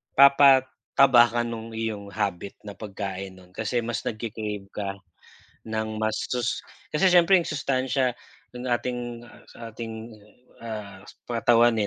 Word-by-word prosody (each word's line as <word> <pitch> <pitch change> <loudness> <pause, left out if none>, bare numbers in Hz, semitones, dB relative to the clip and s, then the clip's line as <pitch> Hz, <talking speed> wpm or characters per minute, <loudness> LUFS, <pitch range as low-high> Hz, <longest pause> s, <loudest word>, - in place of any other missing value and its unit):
Papataba 135 -2 +6
ka 120 0 -1
ng 115 -1 -6
iyong 110 -3 -3
habit 100 -2 -3
na 105 - -7
pagkain 100 -2 -6
no'n 90 -1 -17
kasi 115 +4 -2
mas 115 -1 -2
nagki-crave 105 -3 -5
ka 100 -1 -4 0.7
ng 110 0 -3
mas 110 0 0
sus 125 -2 -2 0.2
kasi 155 +5 +2
siyempre 180 +1 +6
yung 170 - -2
sustansiya 130 -2 0 0.4
ng 125 +1 -7
ating 120 -1 -2 0.5
ating 115 0 -7 0.5
ah, 105 -4 -7 0.3
katawan 115 0 +4
eh 105 - +1
115 Hz, 125 wpm, -26 LUFS, 105-125 Hz, 0.7 s, Papataba